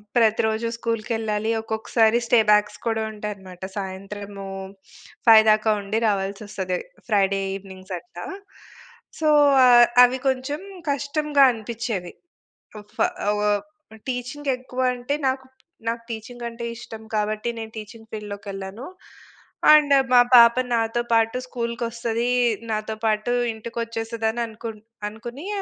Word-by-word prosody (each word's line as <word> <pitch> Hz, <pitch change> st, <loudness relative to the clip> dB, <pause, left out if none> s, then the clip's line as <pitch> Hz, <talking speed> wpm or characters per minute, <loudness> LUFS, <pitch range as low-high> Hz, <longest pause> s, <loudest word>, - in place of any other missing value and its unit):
ప్రతిరోజూ 220 Hz, 0 st, +2 dB
స్కూల్‌కేళ్ళాలి. 225 Hz, -1 st, -2 dB
ఒక్కొక్కసారి 220 Hz, +1 st, +2 dB
stay 235 Hz, 0 st, +4 dB
backs 210 Hz, 0 st, +3 dB
కూడా 225 Hz, -1 st, 0 dB
ఉంటాయన్నమాట. 200 Hz, -4 st, -8 dB
సాయంత్రము 195 Hz, +1 st, -6 dB, 0.8 s
5:00 220 Hz, -1 st, +9 dB
దాకా 215 Hz, +1 st, +3 dB
ఉండి 200 Hz, +2 st, -2 dB
రావాల్సి 195 Hz, -1 st, -1 dB
వస్తది. 190 Hz, -3 st, -3 dB, 0.3 s
ఫ్రైడే 195 Hz, -3 st, +2 dB, 0.2 s
ఈవెనింగ్స్ 190 Hz, -1 st, -9 dB
అట్ల. 175 Hz, 0 st, -16 dB, 1.0 s
సో, 315 Hz, -, +1 dB, 0.8 s
అవి 250 Hz, +1 st, +4 dB
కొంచెం 265 Hz, +4 st, -1 dB, 0.3 s
కష్టంగా 285 Hz, +1 st, +2 dB
అనిపించేవి. 225 Hz, -5 st, -4 dB, 0.9 s
ఫ -, -, -28 dB, 0.3 s
ఆహ్, 210 Hz, 0 st, +1 dB, 0.5 s
టీచింగ్ 255 Hz, +3 st, -3 dB
ఎక్కువంటే 255 Hz, +1 st, -2 dB
నాకు 260 Hz, 0 st, -2 dB, 0.4 s
నాకు 230 Hz, 0 st, -2 dB
టీచింగ్ 235 Hz, +2 st, -7 dB
అంటే 235 Hz, 0 st, -7 dB
ఇష్టం 225 Hz, -1 st, -9 dB
కాబట్టి 215 Hz, +2 st, -1 dB
నేను 225 Hz, -1 st, -6 dB
టీచింగ్ 220 Hz, +1 st, -10 dB
ఫీల్డ్‌లోకెళ్ళాను. 200 Hz, +1 st, -7 dB, 0.9 s
అండ్, 300 Hz, -2 st, +6 dB, 0.2 s
మా 245 Hz, -, +8 dB
పాప 235 Hz, -1 st, +9 dB, 0.2 s
నాతో 230 Hz, +1 st, +1 dB
పాటు 225 Hz, +2 st, +3 dB
స్కూల్‌కొస్తది, 235 Hz, -1 st, -2 dB, 0.4 s
నాతో 215 Hz, 0 st, -2 dB
పాటు 215 Hz, +2 st, +1 dB, 0.2 s
ఇంటికొచ్చేస్తదననుకుం 225 Hz, 0 st, -4 dB, 0.3 s
అనుకుని 240 Hz, -, -9 dB
225 Hz, 105 wpm, -23 LUFS, 210-240 Hz, 1.0 s, 5:00